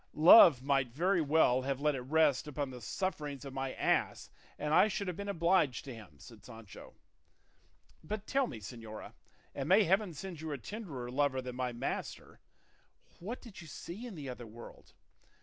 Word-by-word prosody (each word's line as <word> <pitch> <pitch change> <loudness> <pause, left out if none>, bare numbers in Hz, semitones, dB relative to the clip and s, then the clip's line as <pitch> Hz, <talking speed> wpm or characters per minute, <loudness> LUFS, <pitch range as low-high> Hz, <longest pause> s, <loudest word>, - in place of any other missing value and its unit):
"Love 155 - +8
might 135 -2 +2
very 175 +7 +1
well 145 -4 +3
have 135 0 -2
let 150 +1 +1
it 135 - -4
rest 150 +1 +2
upon 145 -2 -4
the 125 -1 -10
sufferings 145 - -4
of 135 - -8
my 135 0 -3
ass, - - -1 0.3
and 150 0 -2
I 205 - +6
should 200 -1 -3
have 180 - -3
been 200 +2 -6
obliged 170 -6 +1
to 135 - -7
him," 105 -10 -13
said - - -15
Sancho. 110 -3 -12 1.1
"But 215 0 -5
tell 270 +2 +1
me, 120 - -8
señora 110 +1 -9 0.4
and 135 +1 -4
may 200 +3 +6
heaven 190 -1 +1
send 175 0 -7
you 160 -1 -5
a - - -3
tenderer 140 - -7
lover 140 0 +1
than 125 -1 -6
my 125 -1 -2
master 120 - -5 0.8
what 220 +8 -6
did 220 -7 -11
you 170 - -11
see 175 - -8
in 220 - -9
the 145 -4 -7
other 125 -2 -7
world? 115 +2 -13
145 Hz, 185 wpm, -32 LUFS, 130-180 Hz, 1.1 s, Love